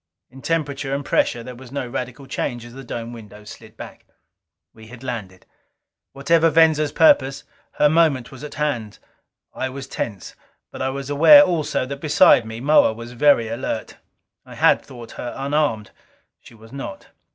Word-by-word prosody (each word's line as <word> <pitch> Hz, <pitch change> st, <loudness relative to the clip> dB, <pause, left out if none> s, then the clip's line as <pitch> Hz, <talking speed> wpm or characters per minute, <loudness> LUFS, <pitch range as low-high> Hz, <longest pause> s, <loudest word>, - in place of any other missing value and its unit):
In 135 Hz, +1 st, -13 dB
temperature 145 Hz, -4 st, -2 dB
and 140 Hz, 0 st, -5 dB
pressure 120 Hz, -, 0 dB
there 125 Hz, +1 st, -8 dB
was 125 Hz, 0 st, -13 dB
no 135 Hz, -2 st, -4 dB
radical 125 Hz, +2 st, -6 dB
change 120 Hz, -2 st, -4 dB
as 120 Hz, -, -12 dB
the 135 Hz, +1 st, -10 dB
dome 120 Hz, -1 st, -6 dB
windows 105 Hz, -2 st, -12 dB
slid -, -, -15 dB
back. -, -, -11 dB, 0.7 s
We 110 Hz, 0 st, -15 dB
had 120 Hz, +2 st, -13 dB
landed. 105 Hz, -8 st, -7 dB, 0.7 s
Whatever 165 Hz, +4 st, +2 dB
Venza's 160 Hz, -2 st, +3 dB
purpose, 135 Hz, -4 st, +3 dB, 0.3 s
her 150 Hz, -, +3 dB
moment 150 Hz, -6 st, +2 dB
was 135 Hz, +1 st, -12 dB
at 150 Hz, -, -8 dB
hand. 120 Hz, -9 st, -3 dB, 0.6 s
I 130 Hz, -, -3 dB
was 135 Hz, +1 st, -8 dB
tense. 100 Hz, -6 st, -6 dB, 0.4 s
But -, -, -8 dB
I 130 Hz, -, 0 dB
was 140 Hz, +1 st, -5 dB
aware 165 Hz, +7 st, +8 dB
also, 165 Hz, -8 st, -1 dB
that 140 Hz, +1 st, -7 dB
beside 145 Hz, -6 st, +4 dB
me 110 Hz, +1 st, -7 dB
Moa 140 Hz, -3 st, +4 dB
was 115 Hz, +1 st, -10 dB
very 125 Hz, -2 st, +3 dB
alert. 115 Hz, -1 st, -5 dB, 0.5 s
I -, -, -13 dB
had -, -, +3 dB
thought 120 Hz, -4 st, -12 dB
her 120 Hz, -, -6 dB
unarmed. 140 Hz, -6 st, -1 dB, 0.5 s
She 120 Hz, -, -17 dB
was 110 Hz, 0 st, -17 dB
not. 190 Hz, +9 st, -8 dB
130 Hz, 170 wpm, -21 LUFS, 115-150 Hz, 0.7 s, aware